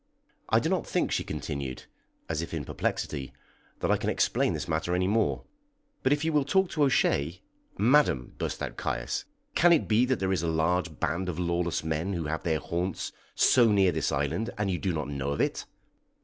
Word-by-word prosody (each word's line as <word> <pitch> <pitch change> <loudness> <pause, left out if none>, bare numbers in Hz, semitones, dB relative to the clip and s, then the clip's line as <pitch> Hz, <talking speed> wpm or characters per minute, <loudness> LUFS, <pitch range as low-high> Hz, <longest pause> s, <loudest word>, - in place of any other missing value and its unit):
"I - - +5
do - - -1
not - - 0
think," - - 0
she - - 0
continued, 70 -3 -5 0.4
as 80 -1 -1
if 85 - -5
in 75 -4 -4
perplexity, 65 +1 -3 0.5
"that - - +1
I - - +4
can - - -2
explain - - +1
this - - -4
matter 80 +3 0
any 90 +1 +1
more; 110 +1 +1 0.6
but 130 - +2
if 145 +2 +2
you 160 - +1
will 150 -2 +4
talk 190 +6 +2
to 155 - -2
O'Shea 85 - +2 0.2
" - - -34 0.2
"Madam," 105 - +3
burst - - -3
out - - -5
Caius, 65 +1 -2 0.3
"can 175 +1 +5
it 165 - +4
be 115 +3 +4
that 130 0 +1
there 95 0 +1
is 90 - 0
a 85 - -1
large 80 0 0
band 90 +4 -1
of 85 - -4
lawless 85 -1 0
men 80 +5 -1
who 85 -3 -2
have 80 +1 -2
their 80 -3 +1
haunts 85 +3 -3 0.2
so 120 -4 +5
near 95 -3 +4
this 80 -3 -1
island, 75 +11 -1
and 105 -2 0
you 90 - -1
do 95 - 0
not 75 -4 -2
know 70 -1 -3
of 70 - -5
it? - - 0
85 Hz, 210 wpm, -28 LUFS, 80-105 Hz, 0.6 s, I